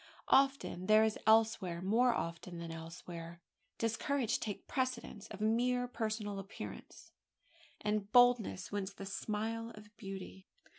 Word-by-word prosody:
Often 270 Hz, -9 st, +3 dB
there 215 Hz, +1 st, +7 dB
as 220 Hz, -1 st, +1 dB
elsewhere 220 Hz, -6 st, +4 dB
more 225 Hz, +7 st, +3 dB
often 170 Hz, -4 st, -4 dB
than 170 Hz, -1 st, -6 dB
elsewhere 165 Hz, +1 st, -8 dB, 0.4 s
does 230 Hz, 0 st, 0 dB
courage 265 Hz, -5 st, 0 dB
take 210 Hz, -3 st, -5 dB
precedence 255 Hz, -5 st, -2 dB
of 210 Hz, -1 st, -9 dB
mere 245 Hz, +3 st, +2 dB
personal 215 Hz, -4 st, -3 dB
appearance, 195 Hz, +2 st, -9 dB, 0.7 s
and 210 Hz, -1 st, -1 dB
boldness 245 Hz, -6 st, +4 dB
wins 200 Hz, -1 st, -3 dB
the 195 Hz, -, -7 dB
smile 220 Hz, +3 st, -3 dB
of 210 Hz, 0 st, -14 dB
beauty. 195 Hz, -2 st, -8 dB
215 Hz, 130 wpm, -35 LUFS, 190-230 Hz, 0.7 s, there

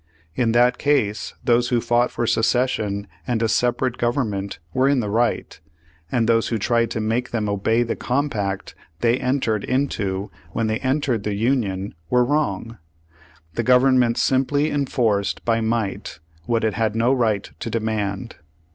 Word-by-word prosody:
In 115 Hz, +3 st, +1 dB
that 125 Hz, +1 st, +3 dB
case, 110 Hz, -8 st, 0 dB
those 120 Hz, 0 st, +2 dB
who 120 Hz, -, +2 dB
fought 120 Hz, +1 st, +2 dB
for 120 Hz, -, -2 dB
secession 115 Hz, -4 st, +1 dB, 0.2 s
and 115 Hz, -1 st, 0 dB
a -, -, +3 dB
separate 125 Hz, +2 st, 0 dB
government 110 Hz, -6 st, -1 dB, 0.2 s
were 130 Hz, +1 st, +3 dB
in 140 Hz, -2 st, +3 dB
the 105 Hz, -4 st, -2 dB
right, 115 Hz, -6 st, 0 dB, 0.5 s
and 115 Hz, -2 st, +1 dB
those 115 Hz, -1 st, +3 dB
who 115 Hz, -, -1 dB
tried 115 Hz, +1 st, +1 dB
to 115 Hz, -, -3 dB
make 115 Hz, +3 st, -1 dB
them 110 Hz, -3 st, -1 dB
obey 110 Hz, +4 st, +1 dB
the 115 Hz, -, -2 dB
compact 110 Hz, -8 st, -2 dB, 0.3 s
they 120 Hz, +2 st, +2 dB
entered 125 Hz, -5 st, 0 dB
into 105 Hz, -7 st, -1 dB, 0.2 s
when 115 Hz, -, 0 dB
they 110 Hz, 0 st, -1 dB
entered 130 Hz, -4 st, 0 dB
the 105 Hz, 0 st, -2 dB
Union 105 Hz, -4 st, 0 dB, 0.2 s
were 125 Hz, 0 st, +3 dB
wrong. 115 Hz, -6 st, -1 dB, 0.7 s
The -, -, -1 dB
Government 125 Hz, -2 st, +4 dB
simply 145 Hz, +3 st, +1 dB
enforced 115 Hz, -8 st, 0 dB
by 115 Hz, -1 st, +2 dB
might 110 Hz, -3 st, -2 dB, 0.3 s
what 115 Hz, -1 st, +1 dB
it 110 Hz, -2 st, +1 dB
had 110 Hz, 0 st, 0 dB
no 115 Hz, +3 st, +3 dB
right 110 Hz, -6 st, +1 dB
to -, -, -4 dB
demand. 105 Hz, -3 st, -2 dB
115 Hz, 155 wpm, -22 LUFS, 110-125 Hz, 0.7 s, Government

